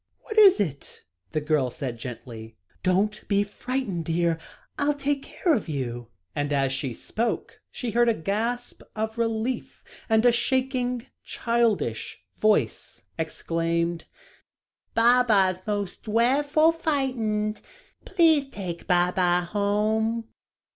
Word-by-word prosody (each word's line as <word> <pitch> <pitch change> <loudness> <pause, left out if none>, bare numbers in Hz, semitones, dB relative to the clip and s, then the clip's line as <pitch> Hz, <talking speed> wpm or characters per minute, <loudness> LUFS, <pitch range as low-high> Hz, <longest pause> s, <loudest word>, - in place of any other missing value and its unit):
"What 435 - -7
is 395 - +8
it?" 150 -9 -4 0.3
the 155 - -1
girl 150 -4 +1
said 125 -3 -5
gently. 115 -2 -8 0.2
"Don't 200 +4 +1
be 200 0 +3
frightened, 205 -4 -3
dear. 165 0 +1 0.4
I'll 290 0 +2
take 285 0 -1
care 335 +4 0
of 215 - -1
you," 120 -5 -4 0.3
and 145 0 -1
as 135 -2 +1
she 135 -1 -2
spoke, 225 - -3
she 245 -3 -4
heard 240 +2 +4
a 230 - +2
gasp 225 +8 -2
of 220 +1 -3
relief, 225 +2 -2 0.3
and 220 +1 +4
a 245 - +7
shaking, 250 0 0 0.2
childish 220 - -1
voice 215 0 0 0.2
exclaimed: 165 +1 -1 0.9
"Baba's 230 -6 +4
most 205 -3 -3
drefful 285 +8 +3
fightened; 240 -9 -1 0.4
please 320 -6 +3
take 180 -7 -6
Baba 180 0 +3
home." 215 +2 0
215 Hz, 115 wpm, -26 LUFS, 170-245 Hz, 0.9 s, is